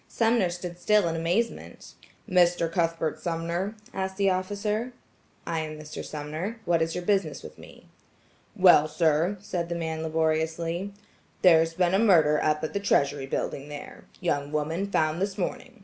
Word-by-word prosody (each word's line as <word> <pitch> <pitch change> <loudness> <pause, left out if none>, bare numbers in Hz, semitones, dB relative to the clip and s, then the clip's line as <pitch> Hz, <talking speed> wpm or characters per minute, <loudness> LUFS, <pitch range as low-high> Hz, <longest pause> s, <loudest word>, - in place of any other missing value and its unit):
Sumner 225 -5 +2
stood 175 0 -6
still 210 0 +3
in 165 - -1
amazement. 175 +8 -2 0.3
"Mr. 175 -2 +3
Cuthbert 165 -2 -1
Sumner?" 170 +4 -2 0.2
asked 190 0 -3
the 195 -1 +3
officer. 210 +6 -2 0.5
"I 165 -1 -2
am 155 -1 -5
Mr. 150 0 -8
Sumner. 155 +9 -5
What 170 -1 +2
is 160 0 -1
your 180 - -3
business 195 -7 0
with - - -11
me?" - - -14 0.7
"Well, 175 -5 +6
sir," 160 +4 +1
said 175 -4 -3
the 170 - -2
man 160 -1 -3
laboriously, 160 +3 -1 0.5
"there's 165 -2 +5
been 180 0 +2
a 195 - +4
murder 160 -9 +4
up 150 0 +1
at 155 - -3
the 200 - 0
Treasury 140 -8 +1
building 140 +1 -3
there. 145 -1 -9
Young 145 -5 -1
woman 160 +6 -2
found 155 -2 0
this 195 -1 -2
morning. 185 - -4
170 Hz, 160 wpm, -27 LUFS, 160-190 Hz, 0.7 s, Well